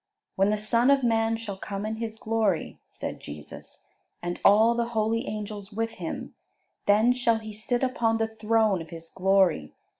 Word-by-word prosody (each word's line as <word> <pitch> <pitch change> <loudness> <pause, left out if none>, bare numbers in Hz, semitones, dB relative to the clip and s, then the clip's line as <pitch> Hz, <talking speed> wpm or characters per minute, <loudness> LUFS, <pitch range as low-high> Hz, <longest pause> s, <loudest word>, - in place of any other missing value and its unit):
"When 195 +1 +3
the 210 - +1
Son 230 +4 +2
of 280 -1 +4
Man 225 -1 +2
shall 210 -4 -6
come 200 +1 -5
in 220 +1 -3
His 225 -1 -5
glory," 220 -7 -1
said - - -6
Jesus, 75 0 -11 0.3
"and 175 0 -4
all 220 +3 +6
the 235 0 0
holy 225 +3 +1
angels 210 -1 -5
with 225 +2 -2
Him, - - -5 0.5
then 215 +4 +5
shall 240 -2 +2
He 220 -1 -8
sit 240 +4 -2
upon 235 -3 +1
the 225 0 0
throne 220 -3 +2
of 165 - -10
His 165 0 -10
glory. 190 - +2
220 Hz, 175 wpm, -27 LUFS, 200-230 Hz, 0.5 s, all